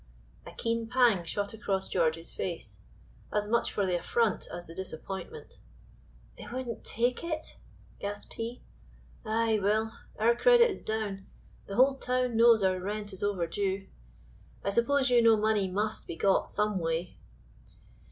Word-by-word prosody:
A - - -8
keen 230 0 -2
pang 240 -7 +4
shot 200 +5 -3
across 195 -3 -2
George's 165 -1 0
face, 110 - -5 0.5
as 210 0 0
much 235 +2 +1
for 200 - 0
the 180 -2 0
affront 225 +2 0
as 175 0 -5
the 165 - -10
disappointment. 190 - -7 0.8
"They - - -9
wouldn't 245 -2 -5
take 245 +5 0
it?" 315 -2 -4 0.4
gasped 205 0 -6
he. 230 +2 -5 0.6
"Ay, 220 0 +1
Will, 215 +3 +1 0.3
our 230 +2 +4
credit 485 - +6
is - - -6
down, 210 -3 -3 0.4
the 195 - -5
whole 265 +3 +5
town 250 -1 0
knows 230 -2 +6
our 185 -1 +2
rent 205 +2 -4
is 190 - -6
overdue. 195 0 -1 0.7
I 200 - 0
suppose 260 +4 +2
you 240 -1 +6
know 225 -1 +6
money 210 -2 +1
must 210 +3 -2
be - - -5
got 195 +3 +2
some 210 -2 0
way." 165 +1 -2
210 Hz, 150 wpm, -30 LUFS, 190-235 Hz, 0.8 s, credit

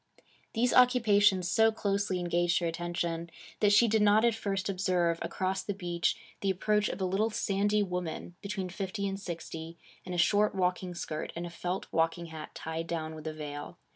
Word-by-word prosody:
These 240 +2 +2
occupations 210 -7 +5
so 225 +3 +4
closely 200 -3 -1
engaged 175 0 +1
her 175 - 0
attention 170 0 -2 0.3
that 205 -1 +4
she 230 +3 +6
did 220 0 +2
not 210 +2 +5
at 235 - +4
first 200 -3 -2
observe, 180 -3 +1
across 190 +1 -1
the 205 - -4
beach, 175 -3 0 0.2
the 195 - 0
approach 210 +3 +1
of 180 - -5
a - - +2
little 195 +4 +1
sandy 205 0 +1
woman 180 -2 -4
between 195 -2 -3
fifty 195 +2 -3
and 195 0 -3
sixty, 165 -2 -6 0.3
in 185 - -7
a 180 - -2
short 205 +4 +3
walking 180 -1 0
skirt 155 -2 -4
and 170 +1 -4
a 175 - -7
felt 180 +2 -3
walking 165 +1 +1
hat 155 -1 -8
tied 160 +1 -4
down 160 -2 -3
with 155 0 -8
a 155 - -3
veil. 145 -1 -7
185 Hz, 185 wpm, -30 LUFS, 170-205 Hz, 0.3 s, she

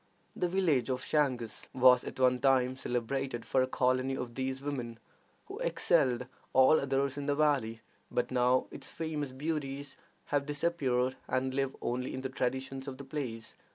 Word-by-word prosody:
The 180 - 0
village 170 -9 +1
of 130 0 -2
Changus 130 -7 0
was 125 -1 +6
at - - -7
one 125 -1 +4
time 130 -1 +3
celebrated 125 0 -2
for 130 - +2
a 130 - +2
colony 130 +1 +1
of 120 -2 -5
these 130 +1 -2
women, 130 -5 -4 0.5
who - - -8
excelled 125 -1 +2 0.3
all 130 +4 +6
others 140 +1 0
in 140 - -4
the 145 - +2
valley; 135 -7 +1 0.3
but 125 - -1
now 125 0 +3
its - - -8
famous 155 -4 -3
beauties 140 -1 -4 0.4
have 140 0 +1
disappeared, 135 -4 0
and 130 0 0
live 135 0 -1
only 125 +2 -2
in 130 - -4
the 130 - -3
traditions 130 +1 -3
of 130 -1 -5
the 140 - -8
place. 125 -6 -5
130 Hz, 165 wpm, -31 LUFS, 125-140 Hz, 0.5 s, was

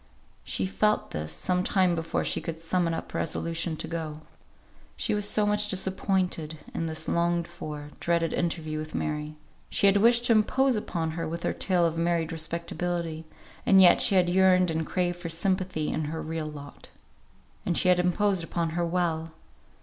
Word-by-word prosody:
She 95 - -2
felt 210 - +1
this 75 +1 -4
some 180 - 0
time 185 -2 +2
before 165 -1 -2
she - - 0
could 165 -1 -5
summon 170 +1 0
up 165 - -5
resolution 165 0 -2
to - - -4
go. 155 -2 -5 0.8
She - - -1
was 205 -1 +2
so 210 - +2
much 210 0 +2
disappointed 190 -4 0 0.2
in 165 - -2
this 160 0 -5
longed 170 0 +1
for, 150 -4 -8
dreaded 170 -1 0
interview 160 -3 -2
with 155 0 -6
Mary; 150 0 -3 0.3
she - - +1
had 200 0 +6
wished 235 +3 +4
to 245 - +3
impose 250 +4 +3
upon 170 -6 -2
her 165 0 -4
with 165 +2 -5
her - - 0
tale 180 -3 +1
of 165 0 -1
married 170 -1 0
respectability, 170 0 -3 0.4
and 195 - +5
yet 180 -2 +7
she 195 - +3
had 180 -2 +4
yearned 185 -1 +4
and 160 0 -2
craved 175 -1 -1
for 170 -1 -5
sympathy 180 -2 0
in 155 - -2
her 160 +2 -4
real 160 -1 -4
lot. 145 -2 -10 0.7
And 175 - 0
she 185 - +3
had 180 0 +5
imposed 180 +1 +1
upon 165 -1 -2
her 175 +1 -1
well. 165 -2 -1
170 Hz, 180 wpm, -27 LUFS, 160-185 Hz, 0.8 s, yet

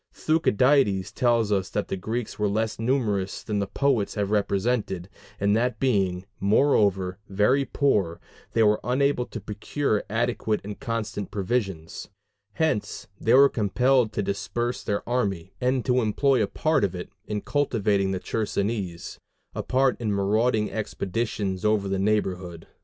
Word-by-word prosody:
Thucydides 130 - +2
tells 115 -3 +2
us 95 -2 0
that 105 - -2
the - - -1
Greeks 110 +5 -4
were 105 - +2
less 110 +2 -1
numerous 110 -6 0
than 105 -2 -2
the 100 - -1
poets 130 -4 0
have 105 -1 -1
represented, 100 -2 0 0.3
and 100 +1 +2
that 120 -1 0
being, 95 -8 +1
moreover, 100 -4 +2
very 105 +8 +2
poor, 100 -13 +1 0.3
they 115 - +4
were 105 0 +4
unable 130 0 +1
to 115 - -6
procure 105 +3 -2
adequate 115 -1 0
and 105 0 -7
constant 115 -3 -3
provisions: 95 -5 -3 0.4
hence 155 - -1
they 115 +3 +3
were 140 +1 +8
compelled 125 +1 +2
to 105 - -1
disperse 100 +5 -2
their 100 -2 -3
army, 100 -7 -1
and 125 0 +1
to 125 -1 +3
employ 125 +4 +2
a 105 - +1
part 155 +6 +1
of 95 -2 0
it 90 - -7 0.2
in 105 -1 -2
cultivating 105 -8 0
the 95 -1 -1
Chersonese 100 -5 -3 0.3
a - - -3
part 130 -1 +1
in 110 -3 0
marauding 105 +3 +1
expeditions 100 -2 -3
over 105 -2 +2
the 95 0 -1
neighborhood. 95 -5 -1
105 Hz, 145 wpm, -25 LUFS, 100-125 Hz, 0.4 s, were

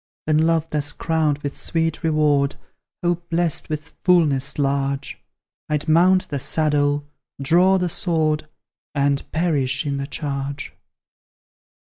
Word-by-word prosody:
Then 155 0 +2
Love 165 -1 +1
thus 145 -1 -1
crowned 160 -3 0
with 140 -1 -4
sweet 165 -1 -1
reward, 150 -3 +2 0.5
Hope 175 0 -1
blest 170 -2 0
with 155 +1 -4
fulness 150 -7 +2
large, 140 -1 -1 0.5
I'd 150 +1 -1
mount 180 +4 +4
the 140 - -2
saddle, 145 0 +1 0.3
draw 175 +7 +4
the 180 -1 0
sword, 155 -3 0 0.5
And 140 0 +2
perish 145 -5 0
in 140 -1 -1
the 140 0 -4
charge! 140 -1 -4
150 Hz, 120 wpm, -22 LUFS, 140-165 Hz, 0.5 s, mount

